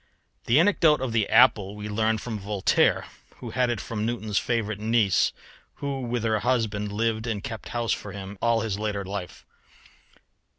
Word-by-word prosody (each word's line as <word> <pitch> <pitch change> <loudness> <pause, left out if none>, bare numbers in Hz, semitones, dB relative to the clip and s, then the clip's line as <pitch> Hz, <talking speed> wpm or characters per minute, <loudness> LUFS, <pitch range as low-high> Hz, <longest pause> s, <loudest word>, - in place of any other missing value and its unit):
The 120 +5 +4
anecdote 165 -4 +4
of 130 -2 -2
the 110 -3 +1
apple 110 -4 +4
we 105 0 -6
learn 110 +1 +1
from 110 0 -5
Voltaire, 100 0 +2 0.3
who - - -8
had 125 -1 +1
it 120 - -1
from 105 -2 -4
Newton's 110 -2 -1
favourite 110 -4 -2
niece, 110 -3 +2 0.4
who 140 -1 -4
with 120 -2 -2
her 110 -1 +1
husband 110 -4 0
lived 110 +2 -1
and 110 -3 -3
kept 110 - -6
house 120 -1 -1
for 105 - -6
him 100 0 -7
all 115 -1 +2
his 105 -2 -2
later 105 -2 -2
life. 95 -2 -6
110 Hz, 170 wpm, -26 LUFS, 105-120 Hz, 0.4 s, The